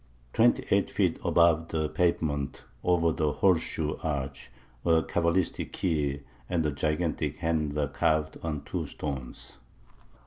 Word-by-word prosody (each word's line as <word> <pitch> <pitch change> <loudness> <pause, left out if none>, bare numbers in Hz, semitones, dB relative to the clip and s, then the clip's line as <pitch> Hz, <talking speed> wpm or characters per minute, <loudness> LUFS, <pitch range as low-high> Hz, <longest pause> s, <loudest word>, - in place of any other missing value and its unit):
Twenty - - +4
eight - - +3
feet - - +1
above 85 -1 +4
the 80 -2 -1
pavement, 75 -4 0 0.2
over 85 -2 +3
the 75 -2 0
horseshoe 80 -2 +1
arch, 70 -5 -3 0.3
a 80 -1 +4
cabalistic 85 +4 0
key 75 -5 0 0.3
and 85 -3 +1
a 75 - +1
gigantic 75 +3 -1
hand 80 -3 -1
are 75 -1 +1
carved 75 +2 0
on 75 -3 -3
two - - -3
stones. 65 -4 -6
80 Hz, 130 wpm, -28 LUFS, 75-85 Hz, 0.3 s, Twenty